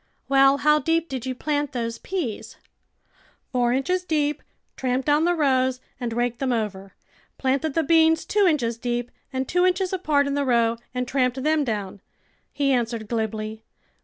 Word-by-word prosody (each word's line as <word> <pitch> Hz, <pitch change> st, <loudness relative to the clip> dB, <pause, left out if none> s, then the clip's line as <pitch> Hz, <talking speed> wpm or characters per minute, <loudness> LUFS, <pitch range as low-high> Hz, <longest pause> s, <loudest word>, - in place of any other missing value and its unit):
" -, -, -45 dB
Well, 275 Hz, 0 st, +5 dB
how 300 Hz, +2 st, +4 dB
deep 330 Hz, +3 st, 0 dB
did 260 Hz, -2 st, -4 dB
you 255 Hz, -, -2 dB
plant 290 Hz, +1 st, -2 dB
those 230 Hz, -2 st, -3 dB
peas? 330 Hz, -, -4 dB, 0.3 s
" -, -, -43 dB
" -, -, -35 dB
Four 245 Hz, -1 st, +2 dB
inches 360 Hz, +9 st, 0 dB
deep, 300 Hz, -4 st, 0 dB, 0.3 s
tramped 255 Hz, 0 st, -1 dB
down 300 Hz, +2 st, +3 dB
the 350 Hz, 0 st, +2 dB
rows, 260 Hz, -4 st, +2 dB, 0.2 s
and 240 Hz, -2 st, -3 dB
raked 240 Hz, +1 st, -1 dB
them 265 Hz, -2 st, 0 dB
over. 200 Hz, -4 st, -3 dB, 0.4 s
Planted 275 Hz, +3 st, 0 dB
the 325 Hz, -, +2 dB
beans 320 Hz, -1 st, +4 dB
two 410 Hz, -2 st, +3 dB
inches 235 Hz, -8 st, 0 dB
deep 240 Hz, 0 st, -2 dB, 0.2 s
and 260 Hz, -1 st, -2 dB
two 360 Hz, 0 st, +2 dB
inches 370 Hz, +1 st, +1 dB
apart 305 Hz, -6 st, +2 dB
in 280 Hz, -, -1 dB
the 285 Hz, 0 st, 0 dB
row 235 Hz, -3 st, +2 dB, 0.2 s
and 250 Hz, 0 st, -1 dB
tramped 255 Hz, 0 st, 0 dB
them 310 Hz, 0 st, +2 dB
down," 205 Hz, -5 st, -4 dB, 0.5 s
he 280 Hz, -1 st, +1 dB
answered 230 Hz, -3 st, -1 dB
glibly. 220 Hz, -1 st, -3 dB
265 Hz, 180 wpm, -24 LUFS, 240-300 Hz, 0.5 s, Well